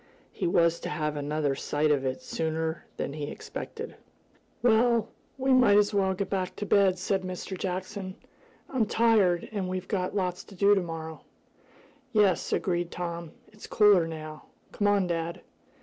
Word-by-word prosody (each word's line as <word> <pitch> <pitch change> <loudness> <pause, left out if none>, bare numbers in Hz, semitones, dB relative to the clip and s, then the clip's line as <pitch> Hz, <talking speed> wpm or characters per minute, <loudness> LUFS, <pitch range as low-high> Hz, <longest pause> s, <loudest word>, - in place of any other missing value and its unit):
He - - -2
was 170 -1 +3
to - - -5
have 150 -2 -2
another 145 0 -1
sight 150 +2 0
of 140 -2 +2
it 130 0 -3
sooner 160 0 -2
than 140 - -3
he 150 -1 -4
expected. - - -7 0.7
"Well, 235 -1 +4 0.3
we 265 0 +2
may 245 -6 +6
as 210 0 +3
well 190 -2 +2
get 200 +1 -2
back 185 -2 -2
to 205 - -4
bed," 195 -2 +4
said 190 +1 0
Mr. 185 +1 -5
Jackson. 185 +1 -4 0.5
"I'm 245 -5 0
tired, 210 -7 +3
and 195 -4 -2
we've 185 0 -4
got 185 -1 -2
lots 180 -2 -1
to 200 - -14
do 200 +2 +5
to 195 - +3
morrow." 160 -2 -6 0.9
"Yes," 205 -5 +3
agreed 175 -2 0
Tom. 170 -2 -5 0.2
"It's 210 0 -12
cooler 205 -6 +5
now. 155 -1 -8 0.3
Come 205 - 0
on, 200 -2 +3
dad." 170 -1 -3
185 Hz, 165 wpm, -28 LUFS, 165-205 Hz, 0.9 s, may